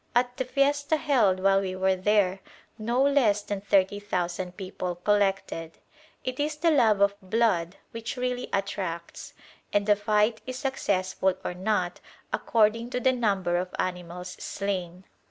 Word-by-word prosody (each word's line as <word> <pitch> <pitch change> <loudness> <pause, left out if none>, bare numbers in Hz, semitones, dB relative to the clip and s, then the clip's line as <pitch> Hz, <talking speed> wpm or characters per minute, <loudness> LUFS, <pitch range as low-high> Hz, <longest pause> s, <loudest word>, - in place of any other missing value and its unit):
At 245 0 +2
the 260 - -1
fiesta 285 +3 +1
held 240 -12 +2
while 195 +1 +4
we 185 -1 -3
were 190 0 +2
there 195 0 +2 0.4
no 240 +4 +1
less 245 -8 +3
than 205 -1 -4
thirty 200 0 +2
thousand 180 -2 -3
people 185 -2 -4
collected. 195 -4 0 0.5
It 255 +1 -4
is 300 +1 0
the 330 +2 +2
love 220 -9 +4
of 200 0 +5
blood 190 -3 +1 0.2
which 230 +3 -5
really 250 0 -2
attracts, 190 -4 -4 0.4
and 205 0 +1
a 210 - +6
fight 210 +2 +1
is 255 0 -4
successful 190 -8 0
or - - -2
not 185 -1 -1 0.3
according 230 +1 +2
to 250 - -2
the 260 +1 +3
number 195 -7 +1
of 180 0 -3
animals 180 0 -4
slain. 185 -3 -4
205 Hz, 150 wpm, -27 LUFS, 185-240 Hz, 0.5 s, a